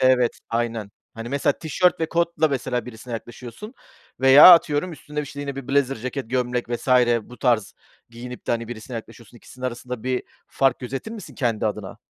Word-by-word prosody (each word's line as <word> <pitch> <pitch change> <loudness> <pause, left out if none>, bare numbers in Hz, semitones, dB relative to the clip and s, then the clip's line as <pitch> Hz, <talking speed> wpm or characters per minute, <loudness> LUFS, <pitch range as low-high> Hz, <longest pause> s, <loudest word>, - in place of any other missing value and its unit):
evet, 130 -2 +3
aynen, 115 -3 -2 0.2
hani, 115 +1 -7
mesela 140 +1 +1
tişört 175 +3 +1
ve 160 - +1
kotla 170 -2 +1
mesela 125 -2 -2
birisine 120 +1 -9
yaklaşıyorsun 125 - -8 0.5
veya 135 +7 +10
atıyorum, 165 +1 +3
üstüne, 150 -1 -6
işte, 145 0 -7
yine 140 -1 -5
bir 135 - -7
blazer 135 -2 +2
ceket, 130 +1 -5
gömlek 125 -1 -1
vs. 120 +2 -4 0.3
bu 125 - -14
tarz 120 -6 +1 0.4
giyinip 125 +1 -9
de, - - -1
hani, 115 -1 -1
birisine 120 +1 -8
yaklaşıyorsun, 115 0 -11
ikisinin 130 +2 -8
arasında 125 -1 -6
bir 130 0 -1 0.2
fark 135 -1 +1
gözetir 135 - -6
misin 220 - -9
kendi 115 -4 0
adına? 105 -2 -5
125 Hz, 175 wpm, -23 LUFS, 120-140 Hz, 0.5 s, veya